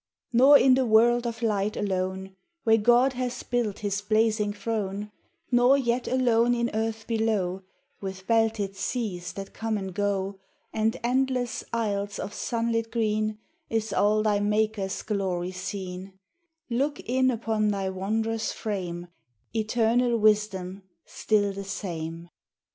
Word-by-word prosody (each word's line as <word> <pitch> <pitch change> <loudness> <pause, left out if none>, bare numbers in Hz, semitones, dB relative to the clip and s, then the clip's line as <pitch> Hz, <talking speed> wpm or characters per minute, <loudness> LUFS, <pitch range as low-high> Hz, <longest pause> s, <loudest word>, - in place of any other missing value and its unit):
Nor 270 +5 +8
in 260 -1 +5
the 260 0 +3
world 240 +2 +4
of 230 0 -5
light 210 -2 0
alone, 190 -1 -2 0.3
Where 225 0 +4
God 240 +4 +4
has 250 0 -3
built 240 -5 -1
his 200 0 -1
blazing 215 0 +2
throne, 205 -1 -3 0.4
Nor 245 +3 +5
yet 245 -2 0
alone 245 -2 +3
in 235 0 0
earth 220 0 -2
below, 215 -5 0 0.4
With 190 -1 -6
belted 225 -3 +1
seas 195 -4 -3
that 195 -1 -8
come 225 -1 -2
and 190 -2 -5
go, 195 0 -1 0.3
And 220 +1 +1
endless 250 0 0
isles 205 -3 -1
of 205 - -5
sunlit 230 0 -1
green, 215 -1 0 0.3
Is 225 -1 -1
all 210 +1 +3
thy 210 -2 +2
Maker's 210 -1 0
glory 185 -4 -2
seen: 185 0 -6 0.5
Look 275 +5 -1
in 260 +2 +2
upon 220 -3 0
thy 195 -2 0
wondrous 220 +4 -1
frame, 180 -5 -4 0.5
Eternal 230 +2 +2
wisdom 205 -3 +1 0.2
still 205 -2 0
the 200 0 -6
same! 170 -4 -5
215 Hz, 130 wpm, -26 LUFS, 195-230 Hz, 0.5 s, Nor